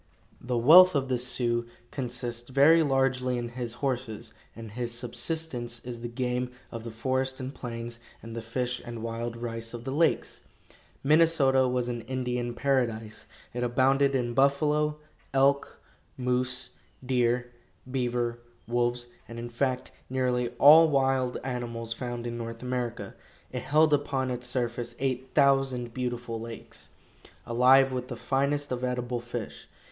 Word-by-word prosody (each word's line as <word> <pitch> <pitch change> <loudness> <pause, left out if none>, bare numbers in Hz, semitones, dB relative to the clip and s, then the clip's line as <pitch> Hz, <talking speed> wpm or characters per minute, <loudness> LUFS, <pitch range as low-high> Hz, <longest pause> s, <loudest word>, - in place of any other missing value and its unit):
The 125 0 -1
wealth 170 +9 +8
of 135 -1 0
the 125 -2 +1
Sioux 120 -1 0 0.2
consists 120 -2 -4
very 145 +5 +6
largely 135 -3 +1
in 120 -1 -3
his 120 -1 -4
horses, 125 -5 -3 0.2
and 115 -1 -9
his 120 +1 -3
subsistence 120 0 -3
is 120 -1 -7
the 120 - -3
game 125 +1 -2 0.2
of 115 -2 -6
the 115 - -6
forest 130 +3 -1
and 130 +1 -5
plains 115 -2 -6 0.2
and 115 0 -8
the 115 - -4
fish 125 +2 -2
and 115 -2 -7
wild 115 +1 -4
rice 115 0 -5
of 120 - -8
the 130 - -4
lakes. 160 +4 +1 0.6
Minnesota 140 -3 +4
was 125 -1 0
an 120 -1 -3
Indian 125 0 -3
paradise. 115 -6 -1 0.3
It 120 - -3
abounded 135 +3 +3
in 120 -2 0
buffalo, 150 +3 +2 0.4
elk, 140 +1 +2 0.4
moose, 125 0 -1 0.3
deer, 125 -1 +1 0.4
beaver, 120 -2 -1 0.3
wolves, 120 +1 0 0.2
and, 115 - -9
in 120 +1 -5
fact, 125 +1 -1 0.2
nearly 125 -2 0
all 155 +3 +8
wild 135 -3 +1
animals 120 -3 -4
found 120 0 -5
in 120 0 -4
North 115 +1 -6
America. 125 -2 -3 0.4
It - - -3
held 155 +1 +3
upon 135 -3 0
its 125 0 -4
surface 120 -1 -2
eight 130 -1 -3
thousand 135 -3 +3
beautiful 120 -2 -3
lakes, 115 0 -8 0.6
alive 130 +3 +5
with 125 -1 -3
the 125 - -5
finest 140 +3 0
of 125 0 -2
edible 125 -1 -1
fish. 120 -2 -7
125 Hz, 145 wpm, -28 LUFS, 120-135 Hz, 0.6 s, wealth